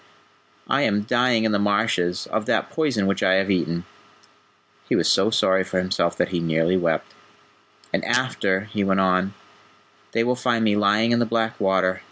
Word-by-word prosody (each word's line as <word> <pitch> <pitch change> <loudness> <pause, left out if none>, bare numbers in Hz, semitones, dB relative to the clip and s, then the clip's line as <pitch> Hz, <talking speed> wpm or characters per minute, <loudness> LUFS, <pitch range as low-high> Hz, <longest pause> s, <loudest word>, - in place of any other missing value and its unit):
I - - +1
am 105 0 +1
dying 120 0 +1
in 110 - +1
the 100 - +1
marshes, 100 -3 0
of 110 -1 -2
that - - 0
poison 135 -11 0
which 100 0 -1
I 95 - +3
have 95 +1 +1
eaten." 85 -1 -1 1.0
He - - +2
was - - +1
so 95 +3 +3
sorry 95 -4 +2
for 95 - -4
himself 90 -2 -1
that - - 0
he 90 -2 -2
nearly 80 +2 +1
wept. 85 -3 -1 0.8
"And - - 0
after," 95 -1 0
he 105 - 0
went 95 0 +1
on, 95 +1 +1 0.8
"they 115 - +1
will 125 +1 0
find 120 -2 0
me 105 -1 +2
lying 105 +3 +2
in 120 - +2
the 120 - +1
black 115 0 -1
water. 95 -1 +1
100 Hz, 185 wpm, -22 LUFS, 95-110 Hz, 1.0 s, I